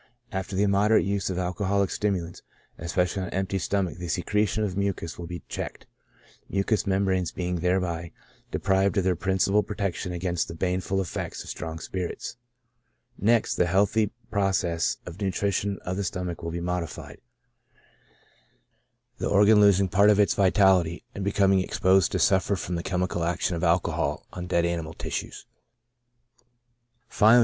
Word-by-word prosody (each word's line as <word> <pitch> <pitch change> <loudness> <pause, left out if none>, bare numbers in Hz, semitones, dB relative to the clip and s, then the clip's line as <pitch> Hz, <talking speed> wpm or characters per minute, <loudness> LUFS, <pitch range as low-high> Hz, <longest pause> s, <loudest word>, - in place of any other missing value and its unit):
After 95 +1 -4
the 100 - +2
immoderate 105 +2 +3
use 100 0 -1
of 90 - -3
alcoholic 95 +2 0
stim 105 -1 0
ulants, 85 -1 -6 0.4
especially 90 +3 0
on 90 - -3
an - - -6
empty 95 +1 -1
stomach, 95 -2 -1
the 90 - -5
secretion 105 +4 0
of 95 -3 -2
mucus 100 -5 -2
will 85 - -6
be 85 -3 -7
checked, - - -6 0.6
mucous 100 +2 0
membranes 95 -2 +1
being 90 -1 -2
thereby 85 -1 -1 0.4
deprived 95 -1 +1
of 95 - +3
their 95 -1 +2
principal 95 +3 +2
protection 100 -3 -3
against 90 0 -1
the 85 - -7
baneful 95 +2 -1
effects 90 - -5
of - - -7
strong 80 +1 -5
spirits; 90 +6 -5 0.8
next, 115 +2 +2
the 90 - +3
healthy 100 +3 +2 0.2
process 95 -5 +1
of 90 +3 -9
nu 100 - +1
trition 100 0 -1
of 90 +1 -2
the 100 - -1
stomach 90 -2 -4
will 85 - -4
be 85 +1 -4
modified; 90 -2 -4 2.0
the - - -1
organ 105 +1 +6
losing 100 -1 +5
part 100 +3 +4
of 105 -1 +4
its 105 - +4
vitality, 95 -3 +3
and 100 - -5
becoming 95 -1 +3
exposed 95 -1 +2
to - - 0
suffer 95 +1 +3
from 90 -1 -4
the 85 - -1
chemical 90 -1 -1
action 85 +1 0
of 85 - -4
alcohol 85 +1 +1
on 90 -1 -6
dead 85 -1 +2
animal 85 -2 -3
tissues; - - -5 1.6
finally. 110 +3 +6
95 Hz, 155 wpm, -26 LUFS, 90-100 Hz, 2.0 s, organ